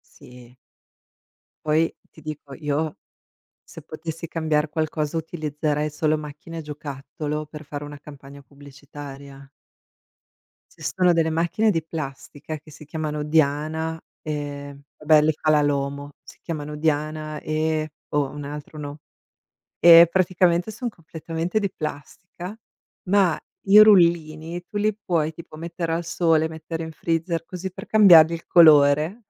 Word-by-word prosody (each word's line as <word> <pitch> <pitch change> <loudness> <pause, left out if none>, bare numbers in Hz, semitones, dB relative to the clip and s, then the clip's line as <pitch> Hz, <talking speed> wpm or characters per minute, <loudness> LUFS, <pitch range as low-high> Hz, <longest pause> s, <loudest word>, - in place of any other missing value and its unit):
Sì. 125 0 -15 1.1
Poi, 155 +2 +2 0.2
ti 160 - -17
dico 145 -2 -8
io, 150 0 -2 0.7
se - - -12
potessi 165 +1 -7
cambiar 155 -2 0
qualcosa, 155 0 -2
utilizzerei 150 -2 -2
solo 155 +1 0
macchine 150 +2 -8
giocattolo, 150 +1 -6
per 150 0 -10
fare 145 0 -7
una 145 0 -9
campagna 140 -1 -13
pubblicitaria. 140 0 -12 1.3
Ci - - -18
sono 180 -2 +2
delle 165 -1 +2
macchine 170 +7 +1
di 165 -5 0
plastica, 155 -1 -7
che 155 +1 -17
si 150 0 -13
chiamano 150 -1 -3
Diana, 155 +2 0 0.2
ehm, 145 -2 -6 0.2
vabbè 150 0 +5
le 155 +1 +2
fa 155 +1 -2
la 150 - +4
Lomo, 140 0 -2
si - - -15
chiamano 150 -2 -5
Diana 155 0 -2
e 155 0 -1 0.2
o 145 -2 +1
un 145 0 -8
altro 150 +1 -8
no 145 +1 -7 0.8
e 170 0 +9
praticamente 180 +1 +2
son 245 +2 -4
completamente 165 +1 -4
di 200 -3 -1
plastica, 175 +6 -7 0.5
ma 195 -5 +3 0.3
i 200 +2 +7
rullini 170 -4 +4
tu 205 - -5
li 215 0 +1
puoi 160 -3 0
tipo 160 -2 -12
mettere 170 0 -4
al 165 +1 -1
sole, 160 -2 +2
mettere 160 +1 -6
in 160 - -8
freezer, 165 +1 -2
così 185 +1 -6
per - - -9
cambiargli 175 -7 +7
il 165 - -6
colore 155 +5 +5
155 Hz, 135 wpm, -23 LUFS, 150-165 Hz, 1.3 s, e